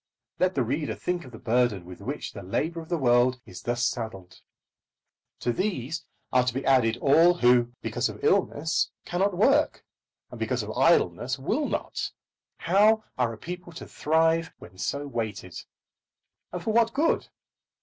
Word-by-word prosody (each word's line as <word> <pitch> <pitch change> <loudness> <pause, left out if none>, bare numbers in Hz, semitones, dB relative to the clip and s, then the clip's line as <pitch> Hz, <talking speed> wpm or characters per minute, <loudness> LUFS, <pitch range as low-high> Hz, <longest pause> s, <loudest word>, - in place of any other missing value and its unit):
Let 185 0 +2
the 135 - +2
reader 140 +6 -2
think 180 -2 -3
of 130 - -12
the 115 - -10
burden 115 -5 +1
with 90 0 -11
which - - -5
the - - -8
labour 160 - -2
of 160 - -13
the 175 - 0
world 125 -2 +3
is - - -10
thus 120 0 -1
saddled. 110 -7 -5 1.0
To 120 - 0
these 165 - -2 0.3
are 125 -1 +5
to 125 - 0
be 135 - -3
added 120 -4 +3
all 165 +7 +5
who, 120 -4 +3
because - - -1
of - - -10
illness 160 +3 +1 0.2
cannot 185 +1 0
work, 280 +9 +3 0.5
and - - -9
because - - -1
of - - -6
idleness - - +2
will - - -1
not. - - -3 0.5
How 210 +5 +4
are 125 -2 +1
a 115 - -8
people 180 +5 -7
to 160 - -8
thrive 160 +1 +1
when - - -14
so 140 +6 -2
weighted? 110 -8 -4 1.0
And 180 - -5
for 220 - -1
what 230 0 +3
good? 315 +4 +1
140 Hz, 165 wpm, -27 LUFS, 120-175 Hz, 1.0 s, are